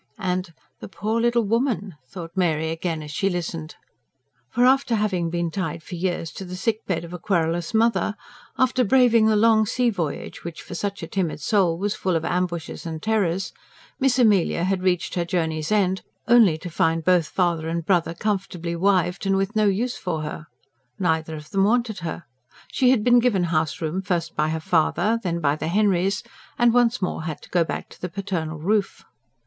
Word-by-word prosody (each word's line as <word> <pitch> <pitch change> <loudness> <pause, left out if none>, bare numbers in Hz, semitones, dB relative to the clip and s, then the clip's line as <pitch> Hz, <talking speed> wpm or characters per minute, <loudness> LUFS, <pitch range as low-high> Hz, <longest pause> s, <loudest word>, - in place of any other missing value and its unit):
And: 185 -3 -2 0.3
"The - - -8
poor 215 +3 -2
little 235 0 +2
woman!" 225 -3 0
thought 165 +4 -9
Mary 160 -4 +1
again 165 -1 -3
as 150 - -8
she 195 +6 0
listened. 165 -3 -4 0.7
For, 245 - +2
after 260 -2 +3
having 190 -6 0
been 170 0 -2
tied 165 -3 -3
for 185 - -10
years 175 -2 -2
to - - -8
the 180 0 -7
sick 220 +4 -1
bed 175 -3 -1
of 170 +1 -9
a 180 - -6
querulous 170 -2 0
mother; 225 -1 +2 0.4
after 255 0 +2
braving 235 -1 +4
the 220 - +3
long 220 0 +4
sea 245 +2 +1
voyage, 170 -8 -4
which 170 -2 -7
for - - -9
such 200 +3 -3
a - - -4
timid 180 -6 -2
soul 175 0 +2
was 200 +3 -1
full 185 -4 -1
of 165 0 -1
ambushes 175 -2 -2
and 160 -2 -6
terrors, 195 -4 0 0.5
Miss 265 -2 +2
Amelia 205 -8 +3
had 190 0 0
reached 180 -2 0
her 175 - 0
journey's 160 -2 -2
end 190 -3 +2 0.3
only 230 -9 +6
to 180 +3 -7
find 165 0 +1
both 180 -4 +3
father 170 -3 0
and 165 0 -2
brother 170 -3 +1
comfortably 185 -4 -2
wived, 185 +1 +1
and 195 0 +2
with 195 +3 -1
no 215 -1 +3
use 225 +5 0
for 160 -4 -3
her. 155 0 -6 0.5
Neither 160 -3 0
of 150 0 -10
them 195 -1 +2
wanted 225 -2 +1
her. 170 0 -5 0.5
She 255 - +3
had 250 -5 +3
been 245 +1 +6
given 230 -7 +2
house 155 -1 0
room 165 +4 -2
first 175 -3 -2
by 155 +1 +1
her 160 0 -2
father, 180 +8 +1
then 170 -4 -2
by 145 -1 +2
the - - -3
Henrys, 195 0 +1 0.3
and 240 -1 +4
once 245 -3 +3
more 180 - -2
had 160 -3 -3
had - - -31
to - - -14
go 175 -2 +3
back - - -5
to - - -16
the 180 - -3
paternal 170 -4 -3
roof. 200 +6 -1
185 Hz, 200 wpm, -23 LUFS, 165-215 Hz, 0.7 s, only